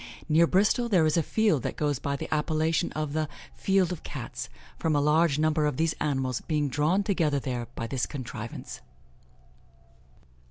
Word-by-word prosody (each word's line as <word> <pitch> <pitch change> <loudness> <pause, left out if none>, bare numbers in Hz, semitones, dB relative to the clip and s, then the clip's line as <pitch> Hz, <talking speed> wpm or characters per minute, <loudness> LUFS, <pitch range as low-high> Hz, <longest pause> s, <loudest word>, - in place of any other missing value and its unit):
Near 165 +1 +5
Bristol 210 +7 +2
there 180 -7 +4
is 155 - +2
a 165 - +4
field 205 - +2
that - - -3
goes 145 -4 0
by 140 0 -2
the - - -5
appellation 155 +1 +1
of 155 -1 -3
the 155 -1 -1 0.2
'Field 190 -2 +2
of 180 - -5
Cats,' - - -6 0.3
from 160 -2 +1
a - - +4
large 150 +1 +3
number 155 -1 +2
of 145 - -2
these 160 0 +1
animals 130 -4 0
being 150 -3 0
drawn 155 +9 +2
together 165 -8 +1
there 125 -3 -3
by 115 - -3
this 125 +1 -2
contrivance." 120 -5 -7
155 Hz, 170 wpm, -27 LUFS, 140-165 Hz, 0.3 s, Near